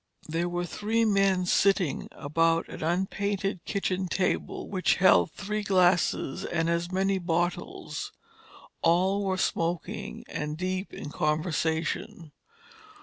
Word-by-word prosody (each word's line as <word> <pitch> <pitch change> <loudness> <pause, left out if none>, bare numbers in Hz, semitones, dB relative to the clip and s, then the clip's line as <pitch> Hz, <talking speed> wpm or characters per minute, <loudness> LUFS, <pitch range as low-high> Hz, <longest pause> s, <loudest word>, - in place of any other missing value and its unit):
There 165 +3 -1
were 175 0 -2
three 220 +5 0
men 195 -3 +3
sitting 190 -4 +2
about 165 +3 +1
an - - -8
unpainted 190 +2 -1
kitchen 190 -2 -1
table 185 +1 -1
which 185 -2 +2
held 190 0 +5
three 210 +1 -3
glasses 180 -7 +2
and 165 -1 -1
as 170 +1 -1
many 190 +1 +1
bottles. 175 0 -2 0.7
All 185 +4 +3
were 190 -1 0
smoking, 170 -2 -2
and 150 +1 -4
deep 185 +2 -2
in 145 - -7
conversation. 160 +1 -1
180 Hz, 115 wpm, -28 LUFS, 165-195 Hz, 0.7 s, held